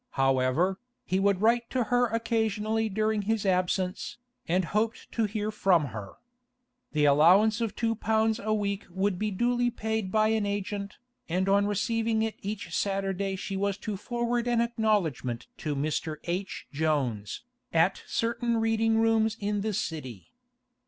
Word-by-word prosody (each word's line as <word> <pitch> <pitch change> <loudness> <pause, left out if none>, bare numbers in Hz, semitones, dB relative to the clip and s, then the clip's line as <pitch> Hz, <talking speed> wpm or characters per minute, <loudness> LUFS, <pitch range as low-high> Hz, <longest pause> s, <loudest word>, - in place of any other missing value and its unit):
However, 135 +8 +2 0.3
he 185 - 0
would 200 0 +2
write 235 +1 +3
to 255 -2 +1
her 245 0 +4
occasionally 220 -1 0
during 215 +1 0
his 215 +1 -1
absence, 185 +2 0 0.3
and 180 +2 +2
hoped 215 +5 -2
to 225 - +1
hear 210 +1 -2
from 180 -8 +2
her. 100 -3 -7 0.8
The 150 -1 +3
allowance 185 +10 +5
of 225 -2 -2
two 230 -1 0
pounds 220 0 +1
a 215 - -2
week 205 -2 -1
would 190 +1 -1
be 215 - 0
duly 240 +4 +1
paid 220 -4 -2
by 215 +1 +3
an 220 -1 +1
agent, 200 0 -3 0.3
and 185 +3 0
on 200 +1 +3
receiving 220 +2 0
it 225 -1 -1
each 200 -4 -5
Saturday 195 -1 -1
she 195 +1 -5
was 200 0 0
to 215 -2 -2
forward 240 +3 -1
an 240 -1 +2
acknowledgment 205 - 0
to 150 -2 -2
'Mr. 155 +2 -1
H. 185 +3 -3
Jones,' 140 - -1 0.3
at 165 +4 +2
certain 235 0 0
reading 225 0 +2
rooms 225 0 +2
in 205 0 -1
the 215 +1 -1
City. 130 - -5
205 Hz, 150 wpm, -28 LUFS, 185-225 Hz, 0.8 s, allowance